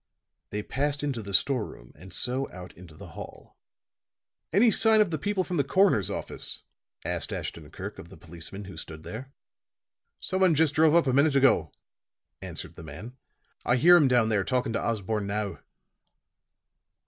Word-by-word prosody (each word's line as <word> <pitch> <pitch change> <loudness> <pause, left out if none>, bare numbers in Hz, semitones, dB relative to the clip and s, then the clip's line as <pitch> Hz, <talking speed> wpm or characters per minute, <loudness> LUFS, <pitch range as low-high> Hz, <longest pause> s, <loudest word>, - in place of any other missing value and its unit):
They 105 0 -4
passed 145 +4 -2
into 135 -5 -2
the 100 -1 -8
store 125 +4 +3
room, - - -11
and 90 +5 -14
so 130 +2 -2
out 90 0 -10
into 85 -3 -14
the - - -11
hall. - - -11 1.0
"Any 220 +6 +5
signs 220 0 +5
of 190 - -7
the 155 - -2
people 200 +3 0
from 180 -1 -3
the 140 - +3
coroner's 140 - +3
office?" - - -4 0.4
asked - - -2
Ashton - - -6
Kirk - - -8
of - - -11
the - - -13
policeman 85 +4 -9
who 95 - -10
stood 80 0 -6
there. 130 +9 -8 0.9
"Someone 185 -3 +2
just 155 -1 +3
drove 155 +1 +4
up 170 - +5
a 130 - +1
minute 140 +2 +3
ago," 130 - +4 0.7
answered - - -7
the - - -11
man. 85 - -9 0.5
"I 120 - +2
hear 175 +8 +7
him 155 -5 +5
down 120 -3 +3
there 105 -3 +1
talking 125 +2 -1
to 115 - -1
Osborne 105 -2 -2
now." 100 0 -3
125 Hz, 170 wpm, -27 LUFS, 100-155 Hz, 1.0 s, hear